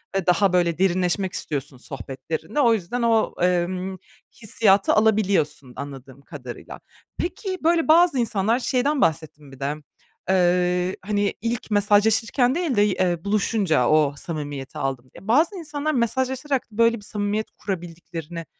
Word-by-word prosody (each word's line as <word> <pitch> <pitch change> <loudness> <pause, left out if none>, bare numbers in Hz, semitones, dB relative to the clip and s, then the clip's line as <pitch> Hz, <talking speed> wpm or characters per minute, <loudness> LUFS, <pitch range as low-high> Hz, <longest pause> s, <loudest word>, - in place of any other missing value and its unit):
ve 195 -2 0
daha 180 +1 +3
böyle 175 -2 +2
derinleşmek 185 0 +1
istiyorsun 145 -2 -4
sohbetlerinde. 135 - -5
O 235 -3 +5
yüzden 220 +4 -2
o, 230 -1 +2
emm, 180 +1 0 0.4
hissiyatı 200 -2 +3
alabiliyorsun 200 - +1
anladığım 140 -1 -9
kadarıyla. 140 -5 -9 0.4
Peki, 370 +2 -3
böyle 330 0 +2
bazı 330 -3 +5
insanlar 225 0 +1
şeyden 270 +3 0
bahsettin 155 -3 -1
bir 135 - -14
de, 140 +2 -2 0.5
eee, 180 0 +2
hani, 205 0 0
"İlk 230 0 -3
mesajlaşırken 220 +5 +3
değil 340 -7 -1
de 205 - +4
y 210 - +4
eee, 175 -3 0
buluşunca 200 - +1
o 150 -2 +3
samimiyeti 145 -4 -6
aldım." 130 -2 -3
diye. 195 - -14
Bazı 310 - +3
insanlar, 305 -3 -3
mesajlaşarak 260 +3 0
böyle 230 +2 +3
bir - - -12
samimiyet 210 +1 -2
kurabildiklerini, 170 -3 -6
195 Hz, 135 wpm, -23 LUFS, 165-230 Hz, 0.5 s, O